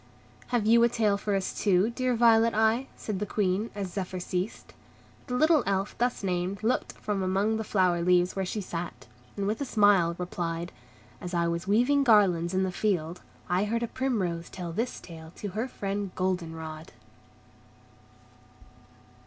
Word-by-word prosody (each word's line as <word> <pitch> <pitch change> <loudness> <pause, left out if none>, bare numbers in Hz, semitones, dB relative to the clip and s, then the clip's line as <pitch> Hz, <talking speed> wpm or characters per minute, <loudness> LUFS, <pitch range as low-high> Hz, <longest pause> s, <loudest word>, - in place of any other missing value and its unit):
"Have 240 -4 0
you 230 +2 +6
a 235 - +5
tale 220 -4 +2
for 200 0 -1
us 190 -1 -2
too, 200 +2 +2
dear 255 +1 0
Violet 230 -1 +4
Eye?" 220 +4 +2
said 205 -4 -4
the 210 - -1
Queen, 205 +2 0
as 195 -3 -4
Zephyr 185 -2 -4
ceased. 180 +3 -4 0.5
The 250 - -2
little 310 +2 +4
Elf 195 0 -1
thus 245 -3 0
named 185 +1 -2
looked 240 +3 0
from 205 -2 -3
among 195 +4 +1
the 220 - -2
flower 185 -5 +2
leaves 180 +1 +3
where 195 - -1
she 205 +3 -3
sat, 175 -2 -6 0.3
and 200 - -1
with 215 +6 -1
a - - +2
smile 205 -8 +3
replied, 175 -1 -4 0.5
"As 180 0 -5
I 170 0 +2
was 170 +2 -3
weaving 245 +8 +3
garlands 190 -7 +4
in 190 - +2
the 190 - -1
field, 180 -4 -1 0.3
I 180 +3 +1
heard 230 +3 -1
a - - -1
primrose 190 -11 -2
tell 175 -2 -6
this 230 +8 -3
tale 160 -1 -11
to 205 - -5
her 220 +6 -3
friend 200 -4 -3
Golden 180 -3 -1
Rod." 160 0 -8
195 Hz, 170 wpm, -28 LUFS, 180-220 Hz, 0.5 s, you